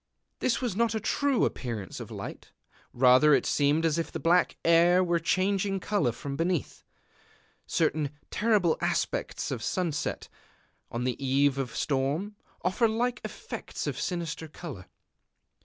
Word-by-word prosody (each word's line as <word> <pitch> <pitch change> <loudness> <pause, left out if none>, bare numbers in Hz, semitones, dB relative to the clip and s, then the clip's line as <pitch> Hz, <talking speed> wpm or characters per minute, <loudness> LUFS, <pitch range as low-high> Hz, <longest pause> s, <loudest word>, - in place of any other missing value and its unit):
This 255 - +1
was 240 -7 -1
not 230 0 +1
a - - 0
true 280 +4 +1
appearance 115 -7 -4
of - - -7
light: - - -8 0.4
rather 130 +4 +6
it - - 0
seemed 145 +3 +2
as 165 0 +2
if 165 - -3
the - - -4
black 175 +2 +3
air 170 +2 +5
were 170 -1 +1
changing 195 +3 +1
color 185 - +1
from 140 +4 -6
beneath.... 170 +1 -2 0.8
Certain 150 -2 +1 0.2
terrible 210 -7 +2
aspects - - -1
of - - -3
sunset, 175 -6 -2 0.6
on 120 +1 -3
the 125 +2 -2
eve 135 +1 +2
of 130 -3 -3
storm, 150 +9 -1 0.3
offer 190 +6 +2
like 240 +3 -1
effects - - -6
of - - -3
sinister 170 -3 -3
color.... 150 - -9
165 Hz, 140 wpm, -28 LUFS, 140-195 Hz, 0.8 s, rather